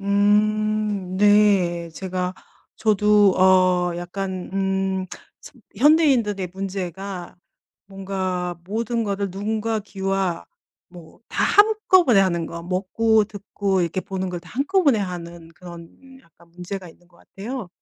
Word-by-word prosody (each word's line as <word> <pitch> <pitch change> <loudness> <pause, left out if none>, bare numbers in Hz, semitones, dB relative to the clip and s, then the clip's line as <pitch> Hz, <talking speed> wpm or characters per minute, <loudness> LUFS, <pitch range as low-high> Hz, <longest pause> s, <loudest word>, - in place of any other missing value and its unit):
음 210 -1 +1
네. 200 -4 +3
제가 185 +2 -4 0.4
저도 210 -2 +4
어 185 -2 +3
약간 185 +1 -5
음, 190 -1 -1 0.7
현대인들의 245 - +3
문제가 190 -1 -6 0.5
뭔가 185 -3 -4
모든 230 +4 -2
거를 200 -1 -2
눈과 215 +3 -2
귀와 195 -3 -2 0.4
뭐 170 -3 -15
다 - - 0
한꺼번에 390 - +4
하는 170 -3 0
거, 170 0 -8
먹고 205 +5 +1
듣고 200 -2 -2
이렇게 175 +2 -1
보는 190 0 -4
걸 175 -1 -5
다 175 - -16
한꺼번에 285 - +2
하는 170 -3 -6
그런 175 +11 -13
약간 170 +1 -24
문제가 180 +2 -7
있는 175 +1 -20
것 175 - -25
같아요. 225 +1 -7
195 Hz, 225 characters per minute, -22 LUFS, 180-210 Hz, 0.7 s, 저도